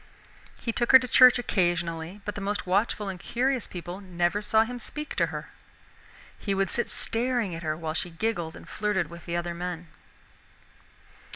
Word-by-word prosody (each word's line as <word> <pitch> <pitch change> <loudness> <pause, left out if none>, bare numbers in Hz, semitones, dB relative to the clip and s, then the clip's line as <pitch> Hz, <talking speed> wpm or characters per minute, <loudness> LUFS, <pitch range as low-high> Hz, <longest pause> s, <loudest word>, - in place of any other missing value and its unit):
He 230 - -2
took 240 +2 0
her - - +14
to 255 -1 -3
church 250 +1 +8
occasionally, 175 -4 -1
but 210 - -3
the 205 - -6
most 205 +1 -2
watchful 205 +2 +1
and 190 -2 -5
curious 250 +4 0
people 175 +2 -7
never 175 +1 0
saw 220 +1 +4
him 245 +2 -6
speak 300 +6 -6
to - - +3
her. - - -7 0.9
He 200 -2 -1
would 195 0 0
sit 240 - +1
staring 235 -4 0
at 165 - -5
her 155 -2 -2
while 160 -1 -3
she 170 +2 -1
giggled 170 -2 -2
and - - -12
flirted 190 -6 -1
with 170 +1 -11
the 170 - -2
other 175 0 -2
men. 175 -1 -5
195 Hz, 180 wpm, -27 LUFS, 175-225 Hz, 0.9 s, her